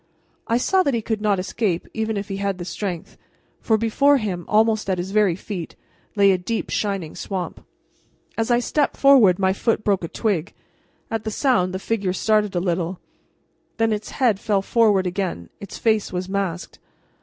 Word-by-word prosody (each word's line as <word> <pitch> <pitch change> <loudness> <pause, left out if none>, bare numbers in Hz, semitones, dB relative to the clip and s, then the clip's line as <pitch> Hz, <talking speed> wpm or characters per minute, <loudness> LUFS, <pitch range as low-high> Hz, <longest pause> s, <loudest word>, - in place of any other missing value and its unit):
I 230 - +2
saw 375 +9 +2
that 280 -8 +1
he 230 - -1
could 220 -1 -2
not 210 -2 +2
escape 185 -1 -2
even 220 -1 -2
if 200 - -4
he 195 - -4
had 195 -1 -2
the 175 - -6
strength, 185 -3 -5 0.4
for 220 - +2
before 275 +6 +3
him, 190 -7 -3
almost 215 -1 +2
at 185 - +1
his 180 +2 -4
very 205 -4 +3
feet, 180 -3 -7 0.4
lay 200 -1 +5
a 185 - +1
deep, 225 +5 -3
shining 195 -7 -2
swamp. 190 -3 -5 0.7
As 225 +1 -1
I 240 - +4
stepped 285 +4 0
forward 255 -10 +6
my 190 -1 +2
foot 220 +2 0
broke 195 -3 +1
a - - -2
twig. 190 -3 -2 0.6
At 225 -1 -2
the 220 - -2
sound 205 -6 +1
the 185 - -3
figure 195 -2 -1
started 210 0 +1
a - - +2
little, 175 0 -2 0.8
then 225 -1 +2
its 210 0 -4
head 235 -7 +1
fell 205 -2 0
forward 210 -4 +3
again. 180 - -3
Its 200 - -8
face 220 -2 +1
was 180 0 -3
masked. 190 -3 -3
200 Hz, 185 wpm, -22 LUFS, 185-225 Hz, 0.8 s, forward